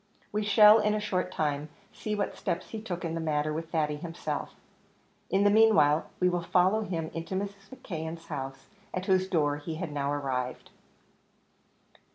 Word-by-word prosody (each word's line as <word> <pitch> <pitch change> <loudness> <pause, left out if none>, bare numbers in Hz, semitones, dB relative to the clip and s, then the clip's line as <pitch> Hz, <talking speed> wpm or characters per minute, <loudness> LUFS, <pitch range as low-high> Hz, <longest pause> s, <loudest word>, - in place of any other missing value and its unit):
We 210 - 0
shall, 210 +1 +7
in 210 0 +2
a - - 0
short 185 -3 -1
time, 150 -2 -1 0.2
see 215 -1 -3
what 205 - -2
steps 175 +2 -3
he 220 - -6
took 180 -5 -4
in 165 - -2
the 165 - -2
matter 155 -1 0
with 165 +1 -4
Thady 150 -3 0
himself. 170 +1 -5 0.7
In 195 +1 +3
the 205 - +5
meanwhile, 210 -9 +5
we 180 - +3
will 175 -1 +1
follow 185 +5 +3
him 165 -6 -3
into 165 +3 -4
Mrs. 200 0 -5
McKeon's 165 -8 -6
house, 135 -2 -6 0.3
at 185 0 -3
whose 190 -1 +2
door 145 -5 +1
he 160 +2 -5
had 165 -1 -4
now 140 -1 -1
arrived. 130 -3 -3
170 Hz, 175 wpm, -29 LUFS, 150-200 Hz, 0.7 s, shall